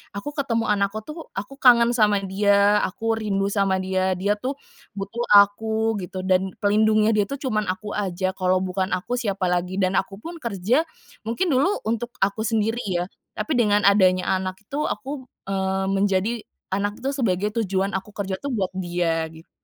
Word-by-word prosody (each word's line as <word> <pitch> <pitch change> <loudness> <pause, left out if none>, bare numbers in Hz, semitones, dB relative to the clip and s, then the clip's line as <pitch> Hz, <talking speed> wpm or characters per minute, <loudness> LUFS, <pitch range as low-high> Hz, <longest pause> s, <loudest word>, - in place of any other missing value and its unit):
Aku, 245 +9 -4
ketemu 230 -7 0
anakku 205 +1 0
tuh, 310 +4 -9
aku 270 +8 -6
kangen 240 -2 +6
sama 210 -3 +3
dia, 200 +1 +3
aku 225 +4 -2
rindu 195 -2 0
sama 195 -2 +2
dia 190 0 0
dia 200 +3 0
tuh 260 +5 -3 0.4
butuh 200 +4 -4
aku, 220 +2 +4
gitu. 185 +1 -6
Dan, 185 0 +1
pelindungnya 215 +1 +4
dia 210 -2 +2
tuh, 275 - -4
cuman 215 -7 -1
aku 195 +3 -3
aja. 185 -2 -1
Kalau 185 0 +2
bukan 185 0 -1
aku, 240 +7 -3
siapa 195 -5 -1
lagi 180 +1 -1
dan 190 -1 +2
aku 195 - -5
pun 335 0 -7
kerja 235 - 0 0.4
mungkin 330 +10 0
dulu 290 +10 +2
untuk 230 +2 -3
aku 205 +3 0
sendiri 225 +1 0
ya. 175 -1 0 0.3
Tapi, 285 -6 -1
dengan 210 -2 +3
adanya 190 -2 +4
anak 185 0 -4
itu, 285 +8 -2
aku, 265 -1 -5 0.2
eee, 190 0 0
menjadi 195 +2 +1 0.4
anak 205 +2 -2
itu 270 - -1
sebagai 210 -7 0
tujuan 195 -1 0
aku 205 +2 -10
kerja 195 -2 -3
tuh, 280 -2 -4
buat 195 -5 0
dia, 175 -3 0
gitu. 160 +1 -15
205 Hz, 175 wpm, -23 LUFS, 190-225 Hz, 0.4 s, kangen